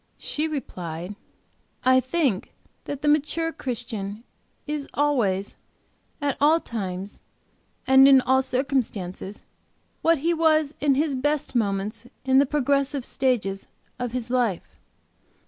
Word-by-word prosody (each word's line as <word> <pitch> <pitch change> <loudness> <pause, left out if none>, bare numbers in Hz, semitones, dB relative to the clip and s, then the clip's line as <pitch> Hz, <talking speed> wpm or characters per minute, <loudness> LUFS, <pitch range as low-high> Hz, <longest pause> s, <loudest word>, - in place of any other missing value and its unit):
She 305 +2 -2
replied, 180 - -5 0.7
"I 260 0 +6
think 260 - -1 0.3
that 285 0 -5
the - - +1
mature 305 +2 +2
Christian 225 -4 -5 0.4
is 295 -2 -3
always, 225 -10 +1 0.6
at 285 -1 0
all 310 +3 +5
times, 195 - -5 0.6
and 265 +1 +7
in 270 -1 +8
all 260 +1 +3
circumstances, 245 -8 -2 0.6
what 330 0 +4
he 330 +5 +1
was 315 -2 +3
in 280 -2 +3
his 295 +1 +1
best 290 +2 -1
moments 215 0 -1 0.2
in 265 0 +5
the 280 - +4
progressive 280 -1 0
stages 210 -7 -1 0.3
of 245 -1 -2
his 245 -1 -4
life. 240 -8 -1
260 Hz, 120 wpm, -25 LUFS, 215-290 Hz, 0.7 s, in